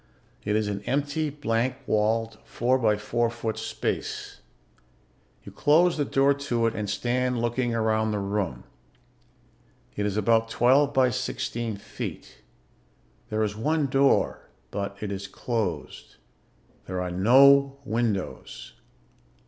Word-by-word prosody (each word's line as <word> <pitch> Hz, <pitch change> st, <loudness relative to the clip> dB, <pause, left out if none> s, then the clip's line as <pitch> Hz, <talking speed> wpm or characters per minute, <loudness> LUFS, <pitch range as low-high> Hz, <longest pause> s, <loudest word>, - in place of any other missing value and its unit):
It 105 Hz, 0 st, 0 dB
is 110 Hz, -1 st, +1 dB
an 100 Hz, -1 st, -3 dB
empty, 145 Hz, +2 st, 0 dB
blank 125 Hz, -3 st, -1 dB
walled, 110 Hz, 0 st, 0 dB
four 125 Hz, +2 st, 0 dB
by 110 Hz, -3 st, +2 dB
four 115 Hz, +2 st, 0 dB
foot 115 Hz, -1 st, -4 dB
space. -, -, -4 dB, 1.0 s
You -, -, -10 dB
close 165 Hz, +4 st, +3 dB
the 145 Hz, -, 0 dB
door 135 Hz, +1 st, +3 dB
to 125 Hz, -5 st, -1 dB
it 115 Hz, -, +1 dB
and 105 Hz, -2 st, -4 dB
stand 125 Hz, +3 st, 0 dB
looking 120 Hz, 0 st, -1 dB
around 110 Hz, -1 st, +1 dB
the 105 Hz, -, -1 dB
room. 100 Hz, -10 st, -2 dB, 1.3 s
It 105 Hz, 0 st, -1 dB
is 100 Hz, 0 st, -2 dB
about 115 Hz, +2 st, +2 dB
twelve 135 Hz, +5 st, +3 dB
by 130 Hz, -2 st, +3 dB
sixteen 120 Hz, -3 st, -3 dB
feet. -, -, -8 dB, 0.9 s
There 110 Hz, 0 st, 0 dB
is 105 Hz, -1 st, -2 dB
one 150 Hz, +7 st, 0 dB
door, 135 Hz, +1 st, +2 dB, 0.2 s
but 100 Hz, 0 st, -4 dB
it 105 Hz, -2 st, -3 dB
is 100 Hz, 0 st, -5 dB
closed. 95 Hz, -, -4 dB, 0.7 s
There 95 Hz, 0 st, -3 dB
are 90 Hz, 0 st, -3 dB
no 135 Hz, +8 st, +5 dB
windows. 110 Hz, -5 st, -3 dB
115 Hz, 130 wpm, -26 LUFS, 105-130 Hz, 1.3 s, no